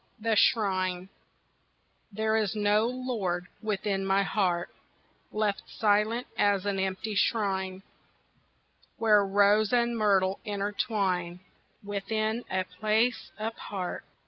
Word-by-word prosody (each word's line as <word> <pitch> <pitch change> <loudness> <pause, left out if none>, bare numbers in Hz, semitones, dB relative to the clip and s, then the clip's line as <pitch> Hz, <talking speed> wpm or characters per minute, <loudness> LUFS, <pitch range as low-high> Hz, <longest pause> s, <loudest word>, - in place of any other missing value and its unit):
The 225 0 +1
Shrine 185 -4 +2 1.0
There 220 +2 0
is 220 -2 0
no 210 +1 +2
lord 230 -9 -2 0.2
within 200 -2 -1
my 195 +1 +2
heart, 180 -2 0 0.6
Left 210 -2 0
silent 215 +3 +1
as 200 -1 +2
an 200 -1 -1
empty 190 +3 -2
shrine 190 -2 0 1.1
Where 215 -2 +4
rose 205 +2 +3
and 240 -1 +2
myrtle 195 -3 +2
intertwine, 195 -4 -1 0.4
Within 215 +3 -2
a 190 0 0
place 215 +6 0
apart. 210 -4 -5
205 Hz, 100 wpm, -28 LUFS, 190-220 Hz, 1.1 s, Where